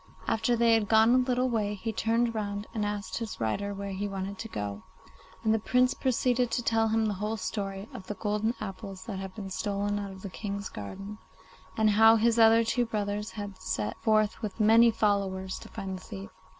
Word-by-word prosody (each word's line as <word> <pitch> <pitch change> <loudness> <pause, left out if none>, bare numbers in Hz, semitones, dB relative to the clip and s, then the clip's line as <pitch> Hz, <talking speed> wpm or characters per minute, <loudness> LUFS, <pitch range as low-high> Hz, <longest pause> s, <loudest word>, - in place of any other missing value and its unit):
After 225 +2 +2
they 230 0 +4
had 220 -2 +2
gone 220 +1 +6
a - - +6
little 250 0 +1
way 210 -4 0
he 220 +3 -4
turned 230 +2 +1
round 205 -1 -3
and 215 -2 -1
asked 205 0 -3
his 230 -2 -5
rider 155 - -1
where 200 0 -5
he 195 +2 -2
wanted 195 0 -5
to 225 - -5
go 105 - -4 0.2
to, - - -22 0.3
and 220 -1 +3
the 220 - +2
Prince 250 +4 +3
proceeded 250 -1 +1
to 240 - -1
tell 225 -1 +2
him 220 0 +2
the 210 - 0
whole 215 +1 -1
story 195 0 -4
of 185 - -9
the 210 - -4
golden 210 +3 -1
apples 195 -2 -7
that 205 -5 -5
had 190 -1 -7
been 195 -3 -6
stolen 205 +1 -1
out 200 -1 -4
of 190 -1 -11
the 200 - -5
King's 200 -1 -4
garden, 195 - -7 0.6
and 215 -1 +4
how 225 +2 +7
his 230 +1 +3
other 225 0 +7
two 240 +1 0
brothers 210 -1 -2
had 205 -3 -7
set 105 0 -2
forth 215 -1 +2
with 215 -1 -5
many 225 +2 +6
followers 200 -4 0
to - - -12
find 190 -1 -5
the - - -16
thief. 100 0 -8
210 Hz, 215 wpm, -29 LUFS, 195-225 Hz, 0.6 s, how